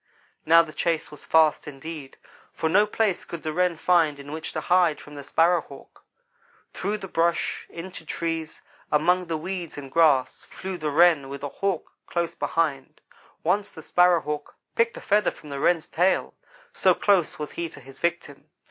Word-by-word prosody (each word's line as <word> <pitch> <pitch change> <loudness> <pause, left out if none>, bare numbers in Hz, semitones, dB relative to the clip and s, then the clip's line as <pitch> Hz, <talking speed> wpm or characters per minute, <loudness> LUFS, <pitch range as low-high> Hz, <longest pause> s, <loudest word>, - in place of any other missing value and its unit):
Now 165 +1 +7
the 155 -2 -10
chase 165 -2 -1
was 150 - -12
fast 160 -2 +3
indeed, 150 0 -8 0.3
for 160 - -2
no 205 +6 +4
place 210 -3 0
could 170 - -8
the 155 -1 -3
Wren 180 0 +2
find 165 -3 +2
in 140 +1 -10
which 160 +1 -5
to - - -2
hide 175 -4 +3
from 150 - -13
the 145 - -7
Sparrow 170 +4 +3
hawk. 140 -2 -15 0.7
Through 205 +3 -2
the 195 -2 -8
brush, 170 -1 0
into 170 0 -8
trees, 165 0 -4 0.3
among 180 +4 +2
the 165 -1 -1
weeds 175 -1 -5
and 135 -2 -8
grass, 145 -6 +3
flew 190 -1 -6
the 155 -1 -1
Wren 155 -2 +4
with 140 0 -7
the 145 - -4
Hawk 195 +3 -2 0.2
close 170 -1 -1
behind. 145 -5 -2 0.4
Once 195 +5 +1
the 160 - -12
Sparrow 180 0 +4
hawk 150 0 -5 0.2
picked 230 0 +1
a - - -8
feather 210 -1 +2
from 150 - -13
the 140 -1 -5
Wren's 165 +2 +2
tail 180 +4 +1 0.4
so - - +3
close 195 -6 +2
was 150 -1 -5
he 170 -1 -4
to 150 - -13
his 135 0 -14
victim. 155 -4 -3
165 Hz, 185 wpm, -25 LUFS, 150-180 Hz, 0.7 s, Now